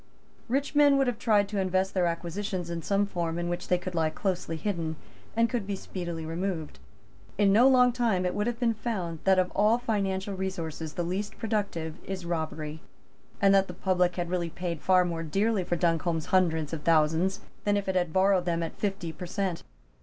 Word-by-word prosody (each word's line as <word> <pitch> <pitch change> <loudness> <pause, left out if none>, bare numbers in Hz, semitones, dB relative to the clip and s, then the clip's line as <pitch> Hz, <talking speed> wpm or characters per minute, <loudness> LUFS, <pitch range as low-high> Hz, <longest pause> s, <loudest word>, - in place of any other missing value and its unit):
Rich 275 +5 0
men 290 -1 +6
would 270 - +3
have 245 -3 -2
tried 210 -4 +3
to 205 -1 -2
invest 190 0 +1
their 180 -2 +2
acquisitions 175 +1 -3
in 170 -1 -3
some 200 +4 +1
form 170 -4 -2
in 175 0 -2
which 175 +1 -3
they 180 - +3
could 180 +1 -6
lie 160 -2 +1
closely 175 -2 -2
hidden 165 -4 -2 0.4
and 230 0 +4
could 230 -5 -3
be 200 - -1
speedily 170 -4 -5
removed. 165 -1 -3 0.6
In 200 -1 +4
no 240 +5 +7
long 250 -2 +6
time 230 -7 +1
it 180 - 0
would 210 +2 -1
have 240 -1 -2
been 235 -2 +2
found 195 -8 -3
that 190 -1 +5
of 185 -1 +2
all 210 +3 +3
financial 200 -4 -1
resources 165 -5 -4
the 175 - -2
least 200 +5 -3
productive 200 -8 -2
is 190 -2 -5
robbery, 155 -2 -3 0.6
and 195 0 +5
that 195 0 +4
the 180 - -8
public 180 -1 +1
had 175 -1 -3
really 175 -2 -1
paid 170 -2 -4
far 185 +1 +4
more 170 -2 -3
dearly 195 +5 +1
for 175 - -1
Duncombe's 165 -1 0
hundreds 165 -4 +2
of 160 - -3
thousands 160 +4 +2 0.2
than 205 0 +2
if 200 - -3
it 190 - +1
had 175 -3 +1
borrowed 190 0 +3
them 170 -1 0
at 165 - -6
fifty 195 -5 -2
per 180 +3 -7
cent. 190 -2 -2
185 Hz, 205 wpm, -28 LUFS, 170-205 Hz, 0.6 s, no